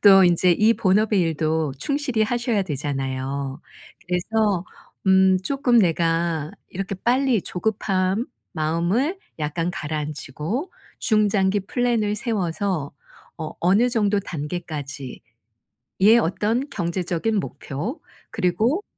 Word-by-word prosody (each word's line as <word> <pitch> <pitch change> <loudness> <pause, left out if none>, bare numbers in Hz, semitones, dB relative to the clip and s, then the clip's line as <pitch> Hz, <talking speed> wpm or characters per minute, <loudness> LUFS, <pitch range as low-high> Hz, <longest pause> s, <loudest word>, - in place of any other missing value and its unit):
또 195 -2 +8
인제 175 0 +4
이 215 +6 +4
본업의 210 0 +3
일도 160 -2 0
충실히 275 - 0
하셔야 235 -2 0
되잖아요. 135 -2 -3 0.5
그래서 190 +1 0 0.4
음 190 0 +5
쪼끔 265 -1 +3
내가 165 -4 +1 0.2
이렇게 195 +1 -4
빨리 245 +1 +2
조급한 195 +2 -1 0.3
마음을 175 - 0 0.2
약간 165 +3 -1
가라앉히고 155 - -4 0.3
중장기 205 -2 +2
플랜을 235 -4 +1
세워서 195 - -1 0.5
어 160 -2 -5
어느 200 +8 +4
정도 210 -3 +2
단계까지의 150 -6 -6 1.0
어떤 225 - 0
경제적인 180 +3 -1
목표 180 - -5 0.3
그리고 220 - +1
190 Hz, 235 characters per minute, -23 LUFS, 160-220 Hz, 1.0 s, 또